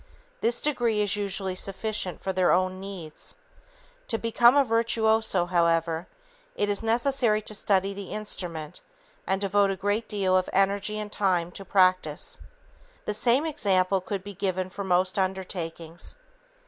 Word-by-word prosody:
This 235 +1 +1
degree 240 -7 +1
is 205 -1 +1
usually 195 -2 -1
sufficient 195 0 -3
for 190 - -1
their 185 -1 +3
own 185 +1 +1
needs. 190 -6 -6 0.7
To 225 - 0
become 235 +3 +4
a 285 - +6
virtuoso, 220 -5 +2
however, 170 -1 +1 0.5
it 205 - 0
is 205 - 0
necessary 235 -1 +2
to 215 - -4
study 195 -1 +1
the 200 -1 -8
instrument 175 -7 -5 0.5
and 190 0 +1
devote 200 0 +2
a 195 - -1
great 205 +4 -1
deal 195 -3 +1
of 185 0 +2
energy 200 +2 +1
and 210 -1 -5
time 180 -5 +1
to 195 - -8
practice. 185 -5 +2 0.7
The 210 - -1
same 240 +7 +2
example 195 -11 +1
could 190 +1 -4
be 205 +1 -8
given 185 -1 -2
for 200 - -5
most 185 +1 +1
undertakings. 175 -3 -3
195 Hz, 150 wpm, -27 LUFS, 185-215 Hz, 0.7 s, a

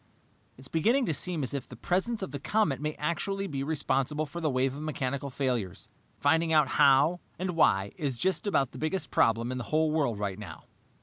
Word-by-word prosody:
"It's 130 +1 -10
beginning 230 - +2
to 165 - 0
seem 165 +1 -2
as 130 - -3
if 140 - -4
the 125 - -10
presence 190 - -1
of 165 - -5
the 140 - -5
comet 155 -4 +1
may 150 0 -2
actually 175 +6 -2
be 140 -7 -4
responsible 150 0 0
for 170 +4 -7
the 155 - +1
wave 130 0 +1
of 145 - -7
mechanical 140 -2 -3
failures. 120 - -2 0.3
Finding 160 +3 +2
out 150 -3 +4
how 140 +6 +4 0.2
and 185 +1 -2
why 100 -11 +3
is 140 -5 -2
just 190 - 0
about 140 -10 +1
the - - -10
biggest 155 +2 -2
problem 115 0 +2
in 130 - -3
the 120 - -5
whole 155 +3 +1
world 140 -8 0
right 100 -1 -3
now." 85 -7 -9
145 Hz, 205 wpm, -29 LUFS, 130-165 Hz, 0.3 s, out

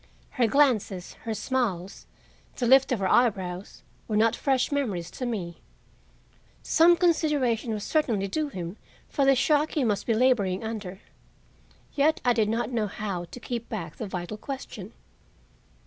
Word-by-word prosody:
Her 245 -3 +2
glances, 220 -9 +1
her 225 -1 -2
smiles, 205 -8 -2 0.5
the 245 - -2
lift 265 +2 +5
of 250 - +2
her 195 -2 -1
eyebrows 190 -5 0 0.2
were 215 - 0
not 225 +1 +3
fresh 265 -1 +1
memories 205 -12 -2
to 250 - -4
me. 180 -8 -4 1.0
Some 340 +2 +5
consideration 295 - +1
was 210 -2 -3
certainly 230 -11 0
due 305 +8 -2
him 180 -4 -6 0.3
for 280 - +1
the 270 0 +5
shock 300 +4 +2
he 295 - +1
must 210 -4 -1
be 230 - +2
laboring 220 -6 +2
under. 210 -4 -6 0.9
Yet 300 +2 +2
I 245 - +5
did 220 -3 +1
not 230 +3 -1
know 225 -3 0
how 195 -3 -4
to 245 - -11
keep 235 -1 -5
back 170 -8 -5
the 220 - -4
vital 185 +2 -5
question. 230 -5 -7
230 Hz, 155 wpm, -26 LUFS, 195-265 Hz, 1.0 s, lift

